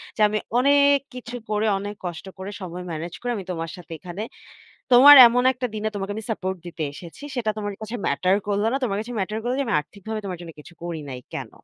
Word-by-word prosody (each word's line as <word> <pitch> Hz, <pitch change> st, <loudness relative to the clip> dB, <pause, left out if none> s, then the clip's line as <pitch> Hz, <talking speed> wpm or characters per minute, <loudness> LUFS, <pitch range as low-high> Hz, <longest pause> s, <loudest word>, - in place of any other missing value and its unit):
যে, -, -, -3 dB
"আমি 215 Hz, 0 st, 0 dB, 0.2 s
অনেক 280 Hz, +1 st, +5 dB, 0.2 s
কিছু 245 Hz, -1 st, -7 dB
করে, 210 Hz, 0 st, +1 dB
অনেক 205 Hz, +1 st, -5 dB
কষ্ট 175 Hz, 0 st, -5 dB
করে 190 Hz, +2 st, -5 dB
সময় 180 Hz, 0 st, -6 dB
ম্যানেজ 165 Hz, +2 st, -5 dB
করে 245 Hz, -, -2 dB
আমি 195 Hz, -, -6 dB
তোমার 165 Hz, -2 st, -4 dB
সাথে 175 Hz, -2 st, -13 dB
এখানে 180 Hz, +4 st, -7 dB, 0.7 s
তোমার 270 Hz, +4 st, +10 dB
এমন 245 Hz, +1 st, +1 dB
একটা 250 Hz, 0 st, -3 dB
দিনে 215 Hz, 0 st, -2 dB
তোমাকে 195 Hz, 0 st, -3 dB
আমি 220 Hz, -, -5 dB
সাপোর্ট 190 Hz, -3 st, -3 dB
দিতে 165 Hz, -2 st, -5 dB
এসেছি। 170 Hz, -, -11 dB
সেটা 235 Hz, -4 st, -1 dB
তোমার 205 Hz, -1 st, -3 dB
কাছে 215 Hz, +2 st, -5 dB
ম্যাটার 185 Hz, +7 st, +2 dB
করলো 205 Hz, +1 st, +1 dB
না। -, -, 0 dB
তোমার 200 Hz, -5 st, 0 dB
কাছে 240 Hz, +3 st, -7 dB
ম্যাটার 210 Hz, +3 st, -2 dB
করলো 245 Hz, +2 st, -1 dB
যে, -, -, +2 dB
আমি 220 Hz, -, +1 dB
আর্থিকভাবে 210 Hz, +7 st, -7 dB
তোমার 185 Hz, -2 st, -4 dB
জন্য 170 Hz, -1 st, -8 dB
কিছু 150 Hz, -, -13 dB
করি 170 Hz, -2 st, -4 dB
নাই 130 Hz, -1 st, -6 dB
কেন?" -, -, -5 dB
205 Hz, 220 wpm, -24 LUFS, 180-235 Hz, 0.7 s, তোমার